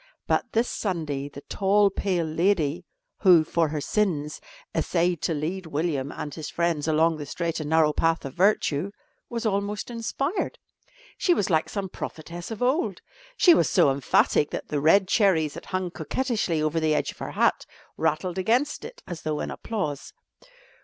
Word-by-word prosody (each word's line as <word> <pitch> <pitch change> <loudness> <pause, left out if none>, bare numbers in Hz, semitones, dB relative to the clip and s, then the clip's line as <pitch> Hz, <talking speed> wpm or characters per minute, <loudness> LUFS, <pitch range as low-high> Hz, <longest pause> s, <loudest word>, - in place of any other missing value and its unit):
But - - 0
this 230 +2 +2
Sunday 155 -8 -3
the 140 - -10
tall, 200 +3 +2
pale 185 -3 0
lady 165 0 +1 0.3
who, 180 -5 +6
for 165 +1 +1
her 150 0 -3
sins, 155 -4 -1 0.3
essayed 175 -1 +1
to 165 - 0
lead 170 +4 -3
William 145 -3 -1
and 145 - -6
his 155 -1 -6
friends 170 -3 0
along 160 +1 +3
the 150 - -6
straight 170 +2 -2
and 150 -1 -4
narrow 160 -1 +4
path 165 -1 +1
of 135 - -6
virtue, 185 -3 +2 0.4
was 235 -1 -4
almost 205 +2 -1
inspired. 275 - -2 0.6
She 355 - +3
was 195 - 0
like 160 -1 +2
some 200 -2 -3
prophetess 170 -1 -7
of 225 +1 -4
old. 275 +8 +1 0.4
She 350 - +7
was - - +3
so 175 -7 +4
emphatic 140 +2 +2
that - - -6
the 145 -2 -1
red 185 +6 +5
cherries 180 -8 +3
that - - -9
hung 185 -1 -2
coquettishly 180 - -1
over 155 +1 +1
the 155 -1 +2
edge - - 0
of - - -19
her - - -5
hat - - +1 0.3
rattled 180 +4 -1
against 240 +9 +1
it - - -10
as 170 -3 -7
though 155 -1 -2
in - - -3
applause. 155 -11 -4
170 Hz, 175 wpm, -26 LUFS, 155-200 Hz, 0.6 s, She